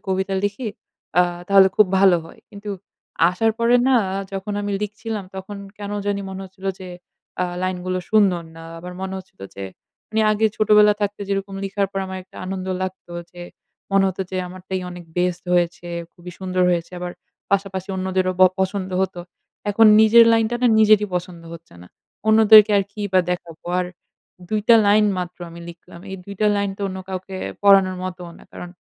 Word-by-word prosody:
কবিতা 190 Hz, +1 st, -1 dB
লিখি 210 Hz, +3 st, -2 dB, 0.5 s
আ -, -, +7 dB, 0.3 s
তাহলে 195 Hz, -1 st, +7 dB
খুব 215 Hz, -, +6 dB
ভালো 190 Hz, -2 st, +6 dB
হয়। -, -, -15 dB
কিন্তু 205 Hz, 0 st, -8 dB, 0.6 s
আসার 225 Hz, +5 st, +1 dB
পরে 235 Hz, +1 st, +4 dB
না 265 Hz, -, +4 dB, 0.4 s
যখন 195 Hz, +2 st, -4 dB
আমি 205 Hz, -, -3 dB
লিখছিলাম 210 Hz, 0 st, -5 dB
তখন 190 Hz, +2 st, -7 dB, 0.2 s
কেন 205 Hz, 0 st, -6 dB, 0.2 s
জানি 200 Hz, 0 st, -1 dB
মনে 190 Hz, 0 st, -7 dB
হচ্ছিল 190 Hz, +1 st, -11 dB
যে 185 Hz, -, -8 dB, 0.5 s
আ -, -, +2 dB, 0.2 s
লাইন 185 Hz, 0 st, -1 dB
গুলো 185 Hz, 0 st, -1 dB
সুন্দর 195 Hz, -5 st, +3 dB
না। 165 Hz, -, -10 dB, 0.2 s
আমার 180 Hz, +1 st, -8 dB
মনে 190 Hz, 0 st, -4 dB
হচ্ছিল 185 Hz, -, -16 dB
যে 100 Hz, -, -7 dB, 0.5 s
আমি 220 Hz, 0 st, +1 dB
আগে 215 Hz, +1 st, +2 dB
ছোটবেলা 210 Hz, 0 st, +5 dB
থাকতে 205 Hz, 0 st, -2 dB
যেরকম 195 Hz, 0 st, -3 dB
লেখার 195 Hz, 0 st, -1 dB
পর 195 Hz, -, -2 dB
আমার 190 Hz, 0 st, -6 dB
একটা 185 Hz, -, -20 dB
আনন্দ 190 Hz, 0 st, -4 dB, 0.2 s
লাগতো 185 Hz, -2 st, -6 dB, 0.2 s
যে 175 Hz, -, -11 dB, 0.5 s
মনে 195 Hz, 0 st, +4 dB
হত 190 Hz, -, -6 dB
যে 185 Hz, -, -4 dB
আমারটাই 185 Hz, +1 st, -5 dB
অনেক 175 Hz, -1 st, -9 dB
বেস্ট 180 Hz, 0 st, -1 dB
হয়েছে, 175 Hz, 0 st, 0 dB, 0.3 s
খুবই 180 Hz, -1 st, -11 dB
সুন্দর 185 Hz, -1 st, -1 dB
হয়েছে। 170 Hz, +1 st, -2 dB
আবার 175 Hz, 0 st, -5 dB, 0.4 s
পাশাপাশি 195 Hz, -1 st, -1 dB
অন্যদেরও 185 Hz, 0 st, 0 dB
ব -, -, +8 dB, 0.2 s
পছন্দ 190 Hz, 0 st, -2 dB
হত। 190 Hz, -, -2 dB, 0.6 s
এখন 225 Hz, +2 st, +5 dB
নিজের 230 Hz, +1 st, +7 dB
লাইনটা 225 Hz, +1 st, +2 dB
না -, -, +5 dB
নিজেরই 215 Hz, -1 st, +5 dB
পছন্দ 175 Hz, -1 st, -4 dB
হচ্ছে 165 Hz, -, -14 dB
না। -, -, -13 dB, 0.4 s
অন্যদেরকে 220 Hz, -1 st, +8 dB
আর 195 Hz, -, 0 dB
কি 210 Hz, -, -9 dB
বা 185 Hz, -, +5 dB
দেখাবো। 170 Hz, -2 st, -6 dB, 0.2 s
আর 180 Hz, -, -2 dB, 0.6 s
২ 215 Hz, -1 st, 0 dB
টা 230 Hz, -, +9 dB
লাইন 210 Hz, +1 st, +5 dB
মাত্র 180 Hz, 0 st, -5 dB
আমি 170 Hz, +1 st, -11 dB
লিখলাম। 170 Hz, 0 st, -13 dB
এই 190 Hz, -, -5 dB
২ 200 Hz, -, -8 dB
টা 210 Hz, -, +3 dB
লাইন 200 Hz, -1 st, 0 dB
তো 205 Hz, -, -5 dB
অন্য 190 Hz, 0 st, -6 dB
কাউকে 190 Hz, 0 st, -6 dB, 0.3 s
পড়ানোর 195 Hz, -2 st, +5 dB
মতও 180 Hz, -2 st, -6 dB
না। -, -, -16 dB
কারণ 180 Hz, -, -8 dB
190 Hz, 185 wpm, -21 LUFS, 185-205 Hz, 0.6 s, টা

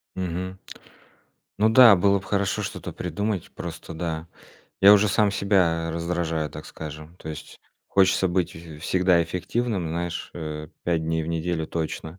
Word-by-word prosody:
Мгм. 90 Hz, +1 st, -4 dB, 1.0 s
Ну 110 Hz, +1 st, +5 dB
да, 115 Hz, -2 st, +9 dB
было 100 Hz, +2 st, +3 dB
б -, -, -14 dB
хорошо 100 Hz, -2 st, 0 dB
что-то -, -, -6 dB
придумать. 95 Hz, +2 st, -3 dB
Просто 85 Hz, 0 st, -7 dB
да, 80 Hz, 0 st, -4 dB, 0.6 s
я 100 Hz, +1 st, +10 dB
уже 105 Hz, +1 st, +5 dB
сам 105 Hz, +1 st, +3 dB
себя 90 Hz, -5 st, +1 dB
раздражаю, 85 Hz, -2 st, -2 dB
так -, -, -9 dB
скажем. 75 Hz, +2 st, -9 dB
То 80 Hz, -, -10 dB
есть 75 Hz, -1 st, -9 dB, 0.3 s
хочется 95 Hz, -1 st, +3 dB
быть 90 Hz, -1 st, 0 dB
в 80 Hz, -2 st, -10 dB
всегда 90 Hz, +1 st, +3 dB
эффективным, 90 Hz, +2 st, -2 dB
знаешь, 85 Hz, +1 st, -4 dB
э, 75 Hz, -2 st, -6 dB
5 85 Hz, -2 st, 0 dB
дней 80 Hz, 0 st, 0 dB
в -, -, -5 dB
неделю 85 Hz, 0 st, -2 dB
точно. 80 Hz, +1 st, -4 dB
85 Hz, 155 wpm, -25 LUFS, 80-95 Hz, 1.0 s, я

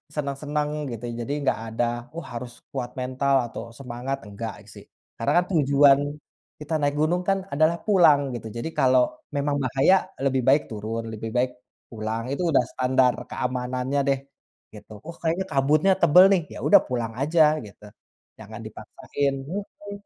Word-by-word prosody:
senang-senang 150 Hz, +1 st, -2 dB
gitu, 115 Hz, 0 st, -7 dB
ya, -, -, -5 dB
jadi 140 Hz, -, -2 dB
nggak 135 Hz, -, +1 dB, 0.2 s
ada, 120 Hz, -, +2 dB, 0.3 s
wah, 170 Hz, -, -6 dB
harus 120 Hz, +1 st, -6 dB, 0.2 s
kuat 125 Hz, -3 st, -4 dB
mental 130 Hz, +2 st, 0 dB, 0.2 s
atau -, -, -6 dB
semangat, 125 Hz, +1 st, -5 dB
enggak, 110 Hz, +2 st, -7 dB
sih. -, -, -13 dB, 0.3 s
Karena 175 Hz, -, +3 dB
tujuan 140 Hz, -4 st, +5 dB, 0.6 s
kita 150 Hz, +2 st, -6 dB
naik 145 Hz, 0 st, +1 dB
gunung, 175 Hz, +3 st, +1 dB
kan, 195 Hz, 0 st, +3 dB, 0.2 s
adalah 155 Hz, +3 st, +3 dB
pulang 170 Hz, -9 st, +5 dB
gitu, 115 Hz, -, -7 dB
jadi 115 Hz, -, -3 dB
kalau 130 Hz, -1 st, +5 dB, 0.3 s
memang 145 Hz, 0 st, 0 dB
bahaya 135 Hz, +8 st, +4 dB, 0.3 s
lebih 135 Hz, -1 st, +2 dB
baik 145 Hz, +3 st, +6 dB
turun, 110 Hz, +2 st, -4 dB
lebih 110 Hz, +1 st, -5 dB
baik 125 Hz, +1 st, +2 dB, 0.4 s
pulang, 110 Hz, 0 st, -3 dB
itu 140 Hz, -, -2 dB
udah 135 Hz, -, +4 dB
standar 130 Hz, -1 st, +2 dB, 0.2 s
keamanannya, 125 Hz, +2 st, -2 dB
deh, 135 Hz, -1 st, +2 dB, 0.5 s
gitu. 105 Hz, -, -13 dB, 0.2 s
Oh, 170 Hz, -, -7 dB
kayaknya 170 Hz, +3 st, 0 dB
kabutnya 150 Hz, +6 st, +3 dB
tebal, 175 Hz, +2 st, +7 dB
nih, 190 Hz, -3 st, +4 dB
ya, -, -, -8 dB
udah -, -, +8 dB
pulang 120 Hz, -3 st, -2 dB
aja 160 Hz, +3 st, +2 dB, 0.2 s
gitu, 105 Hz, 0 st, -15 dB, 0.6 s
jangan -, -, -10 dB
dipaksain, 140 Hz, -1 st, -3 dB
mhm, 205 Hz, +4 st, -7 dB
140 Hz, 155 wpm, -24 LUFS, 125-150 Hz, 0.6 s, udah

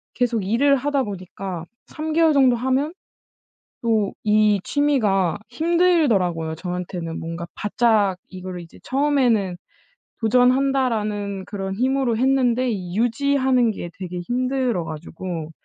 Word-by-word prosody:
계속 240 Hz, -4 st, 0 dB
일을 270 Hz, +8 st, +3 dB
하다 280 Hz, +1 st, 0 dB
보니까 185 Hz, -3 st, -6 dB, 0.3 s
3 310 Hz, +1 st, -4 dB
개월 325 Hz, -1 st, +4 dB
정도 265 Hz, -3 st, +5 dB
하면 260 Hz, +6 st, 0 dB, 0.9 s
또 220 Hz, -4 st, +1 dB
이 210 Hz, -1 st, +3 dB
취미가 210 Hz, -, +1 dB
힘들더라고요, 250 Hz, -, +2 dB
저한테는. 175 Hz, -1 st, -5 dB
뭔가 165 Hz, +1 st, -5 dB
바짝 210 Hz, -3 st, +2 dB
이거를 185 Hz, -1 st, -7 dB
이제 165 Hz, -, -14 dB
처음에는 250 Hz, -9 st, +1 dB, 0.6 s
'도전한다.'라는 230 Hz, -5 st, +1 dB
그런 195 Hz, -2 st, -4 dB
힘으로 255 Hz, +1 st, +1 dB
했는데 255 Hz, -1 st, +2 dB
이 180 Hz, -5 st, -4 dB
유지하는 255 Hz, 0 st, +2 dB
게 175 Hz, -4 st, -7 dB
되게 180 Hz, -2 st, -5 dB
힘들어 250 Hz, -2 st, -1 dB
가지고 165 Hz, +1 st, -6 dB
225 Hz, 270 characters per minute, -22 LUFS, 185-265 Hz, 0.9 s, 정도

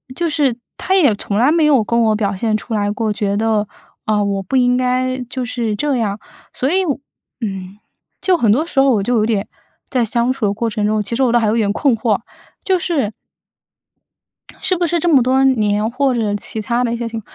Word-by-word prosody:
就 340 Hz, +2 st, -1 dB
是 285 Hz, -5 st, +1 dB, 0.2 s
他 380 Hz, -, 0 dB
也 295 Hz, -, +5 dB
从 200 Hz, 0 st, -3 dB
来 250 Hz, +6 st, +4 dB
没 325 Hz, -1 st, +3 dB
有 275 Hz, -7 st, +4 dB
跟 235 Hz, +2 st, 0 dB
我 220 Hz, -1 st, +3 dB
表 205 Hz, -2 st, -1 dB
现 220 Hz, +2 st, 0 dB
出 225 Hz, -, -7 dB
来 205 Hz, -1 st, 0 dB
过， 215 Hz, +1 st, -1 dB
觉 200 Hz, -1 st, -1 dB
得， 215 Hz, -1 st, +1 dB, 0.4 s
啊， 210 Hz, -1 st, +1 dB
我 200 Hz, -1 st, -1 dB
不 195 Hz, -, -3 dB
应 250 Hz, -1 st, +3 dB
该 255 Hz, 0 st, 0 dB
就 255 Hz, 0 st, -3 dB
是 235 Hz, -3 st, -2 dB
这 285 Hz, +3 st, 0 dB
样。 205 Hz, -4 st, -1 dB, 0.4 s
所 265 Hz, +3 st, -1 dB
以 380 Hz, +1 st, +2 dB
我 290 Hz, -6 st, -1 dB, 0.4 s
嗯， 195 Hz, -2 st, -5 dB, 0.4 s
就 370 Hz, -2 st, +3 dB
很 230 Hz, -, +2 dB
多 280 Hz, +9 st, +2 dB
时 305 Hz, -, -1 dB
候 270 Hz, 0 st, +5 dB
我 210 Hz, -5 st, +1 dB
就 245 Hz, +4 st, 0 dB
有 215 Hz, -2 st, +2 dB
点 215 Hz, -3 st, 0 dB, 0.4 s
在 250 Hz, -3 st, +1 dB
相 235 Hz, +2 st, +1 dB
处 260 Hz, -4 st, -2 dB
的 200 Hz, -, +1 dB
过 230 Hz, +3 st, -2 dB
程 215 Hz, -2 st, -2 dB
中， 215 Hz, 0 st, +1 dB
其 210 Hz, +3 st, -3 dB
实 -, -, 0 dB
我 250 Hz, -, +3 dB
倒 240 Hz, -, +5 dB
还 225 Hz, -, +1 dB
有 215 Hz, -, +1 dB
点 210 Hz, -3 st, +1 dB
困 270 Hz, +1 st, +2 dB
惑， 220 Hz, -2 st, +1 dB, 0.4 s
就 375 Hz, -2 st, +1 dB
是 295 Hz, -, -1 dB, 1.5 s
是 370 Hz, -, +1 dB
不 345 Hz, -1 st, 0 dB
是 340 Hz, +1 st, 0 dB
这 345 Hz, -, -1 dB
么 270 Hz, -, +6 dB
多 260 Hz, +2 st, +2 dB
年， 215 Hz, -5 st, +2 dB
或 265 Hz, +1 st, +1 dB
者 215 Hz, -4 st, 0 dB
其 215 Hz, +2 st, -5 dB
他 235 Hz, +3 st, 0 dB
的 235 Hz, -1 st, -1 dB
一 -, -, -2 dB
些 235 Hz, 0 st, -3 dB
情 225 Hz, -1 st, -5 dB
235 Hz, 250 characters per minute, -18 LUFS, 210-265 Hz, 1.5 s, 么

